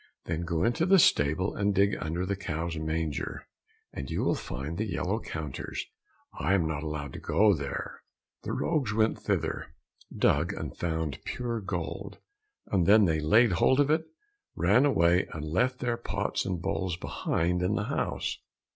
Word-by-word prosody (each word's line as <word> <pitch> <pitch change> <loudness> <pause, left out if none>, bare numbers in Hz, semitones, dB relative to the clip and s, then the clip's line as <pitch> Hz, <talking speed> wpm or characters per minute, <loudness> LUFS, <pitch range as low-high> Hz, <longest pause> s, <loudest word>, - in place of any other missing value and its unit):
"Then 80 0 -2
go 85 0 0
into 160 +9 +2
the 195 +1 +7
stable 80 - +3
and 100 0 +1
dig 100 +1 +3
under 85 +4 -2
the 100 +1 -1
cow's 85 -3 -3
manger, 80 -1 -3 0.5
and 70 - -6
you - - -1
will - - +2
find 75 +8 -5
the 110 -1 -1
yellow 95 +5 -1
counters. 75 - -5 0.5
I 95 - +2
am 85 -5 +2
not 80 -2 -2
allowed 75 -3 -4
to - - -6
go 105 0 +4
there." 70 -5 -5 0.4
The - - -5
rogues 135 -10 0
went 110 0 +2
thither, - - -2 0.4
dug 80 +4 +2
and - - -6
found 80 -3 -2
pure 120 -2 -3
gold. 95 +1 -4 0.5
Then 100 +3 +5
they 80 -3 +1
laid 110 +10 +5
hold 130 +10 +3
of 145 +1 +4
it, 160 +1 +1 0.5
ran 105 +10 +4
away, 90 -7 +3
and 80 -1 -5
left 125 +11 +1
their 120 -1 0
pots 105 -3 -2
and 90 -3 -2
bowls 95 -1 -2
behind 85 +4 -1
in 90 +4 +1
the 105 - 0
house. - - -2
90 Hz, 165 wpm, -29 LUFS, 80-110 Hz, 0.5 s, the